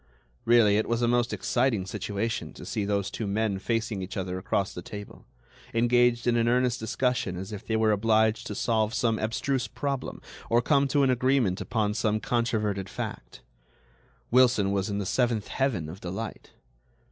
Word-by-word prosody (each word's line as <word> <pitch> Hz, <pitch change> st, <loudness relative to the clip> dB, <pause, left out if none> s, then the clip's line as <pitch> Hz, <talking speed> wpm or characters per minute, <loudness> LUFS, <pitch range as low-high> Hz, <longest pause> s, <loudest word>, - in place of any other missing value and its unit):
Really, 115 Hz, -3 st, +5 dB
it 110 Hz, -, 0 dB
was 115 Hz, +1 st, +1 dB
a -, -, +3 dB
most 120 Hz, 0 st, +2 dB
exciting 120 Hz, -6 st, 0 dB
situation 105 Hz, +3 st, -3 dB
to -, -, -10 dB
see 105 Hz, -, -2 dB
those 100 Hz, -1 st, -1 dB
two 110 Hz, -, -4 dB
men 100 Hz, -1 st, 0 dB
facing 110 Hz, -1 st, -1 dB
each 95 Hz, +2 st, -6 dB
other 95 Hz, -1 st, -3 dB
across 95 Hz, 0 st, -1 dB
the 90 Hz, -, -6 dB
table, 105 Hz, +3 st, -10 dB, 0.5 s
engaged 120 Hz, 0 st, +3 dB
in 120 Hz, -1 st, +3 dB
an 115 Hz, 0 st, +2 dB
earnest 125 Hz, 0 st, +2 dB
discussion 110 Hz, -4 st, -1 dB
as 95 Hz, +3 st, -6 dB
if 105 Hz, -, -8 dB
they 110 Hz, -, 0 dB
were 110 Hz, 0 st, +3 dB
obliged 110 Hz, +1 st, +2 dB
to 105 Hz, -, -5 dB
solve 110 Hz, +1 st, 0 dB
some 115 Hz, -2 st, +1 dB
abstruse 125 Hz, +3 st, -1 dB
problem 135 Hz, +3 st, -4 dB, 0.3 s
or 115 Hz, -, +4 dB
come 140 Hz, +2 st, +3 dB
to 140 Hz, +1 st, +2 dB
an 130 Hz, -, +4 dB
agreement 125 Hz, -6 st, +1 dB
upon 105 Hz, -3 st, 0 dB
some 110 Hz, -1 st, 0 dB
controverted 110 Hz, -6 st, -1 dB
fact. -, -, -7 dB, 0.9 s
Wilson 120 Hz, -5 st, +4 dB
was 100 Hz, 0 st, 0 dB
in 100 Hz, -, -2 dB
the 100 Hz, -, -2 dB
seventh 115 Hz, 0 st, 0 dB
heaven 120 Hz, -, -1 dB
of 90 Hz, +5 st, -9 dB
delight. 95 Hz, +5 st, -6 dB
110 Hz, 175 wpm, -27 LUFS, 100-120 Hz, 0.9 s, Really